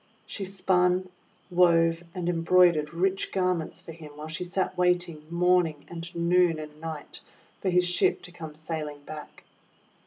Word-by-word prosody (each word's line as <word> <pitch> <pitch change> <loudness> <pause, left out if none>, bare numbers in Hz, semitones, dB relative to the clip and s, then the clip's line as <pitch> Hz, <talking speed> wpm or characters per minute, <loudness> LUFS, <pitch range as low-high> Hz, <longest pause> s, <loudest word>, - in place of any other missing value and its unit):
She 200 - -5
spun, 185 -1 +1 0.4
wove, 165 -1 +4
and 180 -2 -3
embroidered 170 -2 +4
rich 190 +3 0
garments 180 -4 -1
for - - -10
him, 155 -2 -12
while 155 +1 -7
she 160 +3 -4
sat 185 +1 -2
waiting 175 -4 0
morning 170 -3 +2
and 170 0 -6
noon 170 0 +3
and 150 0 -9
night 160 -2 -6 0.4
for 190 - 0
his 180 0 +3
ship 180 - +2
to 180 - -9
come 160 -3 -9
sailing 155 -2 -5
back. 150 0 -10
170 Hz, 150 wpm, -27 LUFS, 155-180 Hz, 0.4 s, wove